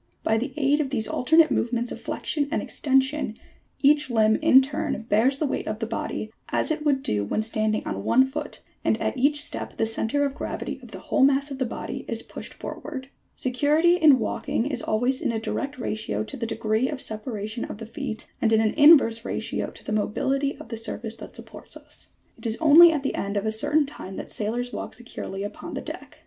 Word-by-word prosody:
By 220 0 +2
the 260 +4 -3
aid 290 0 +3
of 290 -3 0
these 225 -5 0
alternate 320 +5 +4
movements 240 0 0
of - - -7
flexion 290 -2 -2
and 315 - 0
extension 265 -4 0 0.5
each 290 0 +4
limb 220 -2 +4
in 305 -4 +7
turn 295 0 -2
bears 245 +6 +3
the 305 - 0
weight 275 - -2
of 215 - -2
the 225 - -3
body, 220 -1 -4 0.2
as - - 0
it 305 -1 -2
would 280 -3 +1
do 105 -1 0
when 160 - -1
standing 215 -1 -1
on 100 0 -4
one 250 - +5
foot, 295 +2 -6 0.2
and - - +1
at - - -1
each 290 +3 +2
step - - -5
the 225 - +2
centre 225 +5 0
of 280 - -2
gravity 295 - -5
of - - -12
the - - -8
whole 270 - +1
mass 280 +1 +3
of 270 - -6
the 260 - 0
body - - -5
is - - -3
pushed - - -9
for - - -7
ward. 260 -2 -7 0.3
Security 300 +7 +3
in 305 -5 +6
walking 235 - -1
is 265 -4 -1
always 245 +5 0
in - - 0
a 225 - -2
direct 275 +5 -3
ratio 215 -3 -2
to 245 - -8
the 230 -4 -3
degree 225 +2 0
of 290 - -4
separation 215 -1 -3
of - - -7
the 225 - -7
feet, 230 -1 -6
and 225 - +3
in 220 - +5
an 220 -1 +2
inverse 285 -7 +6
ratio - - -3
to - - -13
the - - -5
mobility 270 +7 0
of 310 - -11
the 230 - -4
surface 225 0 -4
that - - -10
supports - - -9
us. - - -12 0.3
It - - -4
is 225 - +1
only 325 +2 +8
at 300 -4 -2
the 275 - -1
end 200 +1 -2
of 200 - -1
a 220 - +1
certain 290 +7 +2
time 195 -9 -9
that - - -7
sailors 240 +4 -2
walk - - -5
securely 200 -4 -6
upon 205 - -7
the - - -3
deck. - - -9
255 Hz, 220 wpm, -25 LUFS, 220-285 Hz, 0.5 s, only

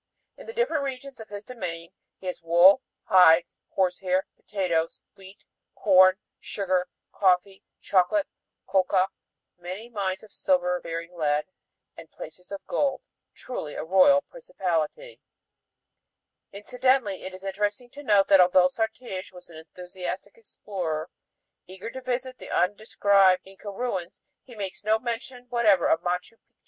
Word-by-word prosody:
In - - -13
the 455 - -7
different 460 -11 0
regions 270 -1 -6
of 220 - -10
his 205 0 -8
domain 175 -8 -6 0.3
he - - -15
has 180 -1 -4
wool, 175 +8 +6 0.2
hides, 175 -3 +5
horsehair, 185 0 0
potatoes, 170 -5 -2 0.2
wheat, 195 0 -15 0.3
corn, 185 -1 +5 0.2
sugar, 185 -2 -1 0.2
coffee, 190 0 +1 0.2
chocolate, 200 - +2 0.4
coca, 190 0 +2 0.5
many 185 +7 -7
mines 195 -4 -3
of 215 - -15
silver 180 -1 +1
bearing 165 +1 -6
lead, 150 -2 0 0.5
and 165 -1 -12
placers 180 +5 -12
of 200 - -7
gold." 280 -2 0 0.3
Truly 155 -12 -6
a - - -4
royal 195 - +5
principality. 325 - -4
FIGURE - - -59
Huadquiña - - -5
Incidentally 250 -2 +1
it 185 0 -7
is 185 - -12
interesting 205 +5 -3
to 285 - -10
note 205 -7 +3
that 195 -2 +8
although 180 0 +5
Sartiges 220 -2 -4
was 180 -1 -14
an 160 - -11
enthusiastic 180 +4 -7
explorer, 180 -7 -5 0.6
eager 190 +5 -8
to 260 - -8
visit 255 0 -4
undescribed 195 -1 +3
Inca 195 +2 -10
ruins, 195 -5 -4 0.2
he 245 - -15
makes 195 -2 -6
no 215 +1 +3
mention 245 +2 -5
whatever 220 -7 +3
of 160 - +2
Machu 180 +5 -3
Picchu. - - -52
190 Hz, 140 wpm, -26 LUFS, 180-225 Hz, 0.6 s, that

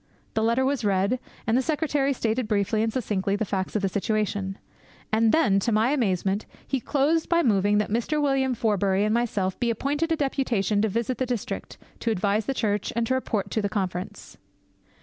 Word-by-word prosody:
The 220 - 0
letter 235 +4 +2
was 275 -2 0
read; 200 +4 +1 0.3
and 225 - +2
the 260 - +4
secretary 295 -2 0
stated 235 -2 -1
briefly 210 +1 +1
and 225 0 +1
succinctly 200 -5 -1
the 215 - -1
facts 190 0 -3
of 210 - 0
the - - +3
situation. 200 -1 -1 0.5
And 220 0 +4
then, 255 -12 +3
to 230 - 0
my 220 +4 +3
amazement, 200 -6 0 0.2
he 270 - 0
closed 295 +5 +1
by 340 0 +3
moving 205 -3 +3
that 210 0 0
Mr. 240 +7 0
William 270 -3 +1
Forbury 200 -3 +1
and 215 - +1
myself 210 -6 0
be 240 - +1
appointed 290 +8 -1
a - - +4
deputation 250 -8 0
to 220 - +1
visit 235 +4 -2
the 260 - 0
district, 240 -4 -4 0.2
to 235 - -1
advise 205 0 0
the 270 - -1
church, 210 -4 0
and 235 0 +1
to 260 - 0
report 225 -6 -1
to 205 -2 0
Conference. 190 +1 -4
220 Hz, 190 wpm, -25 LUFS, 200-260 Hz, 0.5 s, the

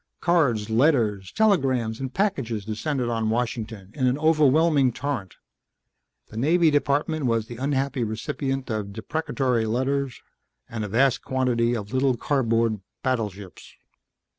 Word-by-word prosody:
Cards, 125 -12 +1
letters, 110 - +2
telegrams 130 - +1
and 130 -1 -4
packages 130 - -1
descended 120 +4 -2
on 115 -2 -1
Washington 110 -4 -3
in 130 -3 0
an 125 +2 +1
overwhelming 155 -2 +4
torrent. 125 -8 -4 0.9
The 110 - -10
Navy 160 +6 +3
Department 145 0 +1
was 115 -2 +1
the 120 +1 -9
unhappy 135 -1 -1
recipient 130 +4 -3
of 105 -2 -3
deprecatory 125 -1 -1
letters 130 +3 -1 0.5
and 110 -2 -5
a - - -3
vast 120 +3 +2
quantity 120 -2 +1
of 105 -1 -6
little 130 -1 +2
cardboard 115 -5 +1 0.2
battleships. 105 -7 -4
125 Hz, 125 wpm, -24 LUFS, 110-140 Hz, 0.9 s, overwhelming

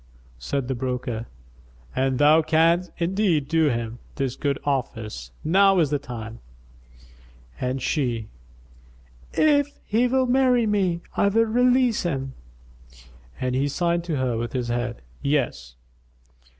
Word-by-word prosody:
Said 125 - -2
the 135 - -1
broker, 125 -2 -3 0.7
"An 130 0 +1
thou 150 +3 +6
canst 165 +3 +2
indeed 175 -4 +1
do 160 -1 +3
him 115 -1 -3 0.2
this 135 -2 -2
good 140 -2 -1
office, 115 - -3
now 195 +4 +4
is 155 -5 +2
the 145 - +1
time," 115 -4 -8 1.2
and 130 +1 -2
she, 120 -6 -1 1.1
"If 285 -2 +2
he 230 +4 +2
will 260 +1 +2
marry 250 -2 +3
me, 190 -5 +1
I - - +3
will 225 +3 +3
release 245 +1 +3
him." 135 -7 -3 1.1
And 125 0 -1
he 135 +2 +1
signed 170 +3 0
to 165 -3 -2
her 125 -3 0
with 120 0 -4
his 125 -2 -2
head, 120 0 -3 0.2
"Yes." 120 - -1
145 Hz, 130 wpm, -24 LUFS, 125-190 Hz, 1.2 s, thou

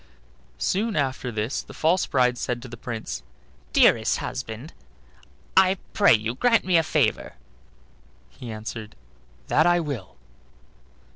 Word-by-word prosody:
Soon 210 - 0
after 130 -3 -1
this 110 +4 -2
the - - -13
false 170 +4 +2
bride 125 -2 +2
said 120 0 -3
to - - -8
the 120 - -9
Prince: 115 - -5 0.5
"Dearest 110 -1 +4
husband, 130 +3 -6 0.8
I 190 0 +5 0.2
pray 200 - +6
you 110 +2 -2
grant 230 - +2
me 185 -1 +2
a 165 - +6
favor." 150 -7 0 1.0
He 115 - -9
answered: 110 0 -7 0.5
"That - - +3
I 175 0 +4
will." 140 - -5
125 Hz, 130 wpm, -24 LUFS, 110-170 Hz, 1.0 s, pray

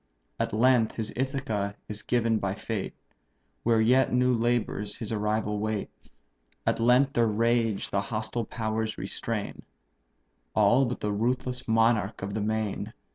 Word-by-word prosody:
At - - 0
length 120 +1 +3
his 110 -2 -4
Ithaca 125 -7 -2
is 105 -1 -7
given 115 -1 +1
by 95 -1 -2
fate, 110 -1 -4 0.7
Where 115 -1 +3
yet 125 +4 +4
new 125 0 +3
labours 115 -3 0
his 115 - -5
arrival 105 -1 0
wait; 110 -1 -2 0.7
At - - +1
length 125 +4 +4
their 115 -1 +3
rage 115 -1 +1
the 100 - +1
hostile 110 +2 -3
powers 110 -1 -2
restrain, 105 +2 -4 0.9
All 120 +6 +5
but 125 0 -4
the 105 - -1
ruthless 125 +3 -1
monarch 110 -3 +2
of 100 +1 -4
the 110 - -2
main. 110 -1 -2
110 Hz, 140 wpm, -28 LUFS, 105-120 Hz, 0.9 s, All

